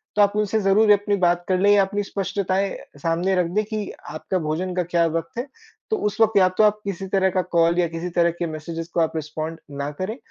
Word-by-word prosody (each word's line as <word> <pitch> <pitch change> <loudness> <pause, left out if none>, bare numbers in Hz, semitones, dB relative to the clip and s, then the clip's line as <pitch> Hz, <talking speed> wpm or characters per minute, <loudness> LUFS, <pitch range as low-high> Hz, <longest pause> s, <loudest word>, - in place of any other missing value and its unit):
तो 210 - +4
आप 205 0 +3
उनसे 210 +1 +1
ज़रूर 210 +2 +4
अपनी 205 0 +3
बात 175 -2 +2
कर 185 - +2
लें 200 +2 +4
या 205 -1 +6
अपनी 205 +2 -1
स्पष्टताएँ 195 -1 -1 0.3
सामने 170 +5 0
रख 180 -1 +2
दें 215 - +3
कि 215 -2 -4 0.2
आपका 155 +5 -3
भोजन 180 +4 -2
का 180 - +1
क्या 170 0 +1
वक़्त 165 +10 -4
है 250 - -3 0.4
तो 435 - +1
उस 215 +2 -5
वक़्त 220 -2 +4
या 185 - +6
तो - - +5
आप 210 0 +3
किसी 195 -1 -4
तरह 190 0 +2
का 185 0 0
कॉल 170 +1 +4
या 175 - +3
किसी 165 +2 -5
तरह 170 0 +4
के 175 - 0
मेसेजेस 165 +1 -6
को 170 - 0
आप 160 0 0
रिस्पॉन्ड 155 +1 -4 0.2
ना 140 +1 -2
करें। 215 +6 -3
185 Hz, 240 wpm, -23 LUFS, 170-205 Hz, 0.4 s, या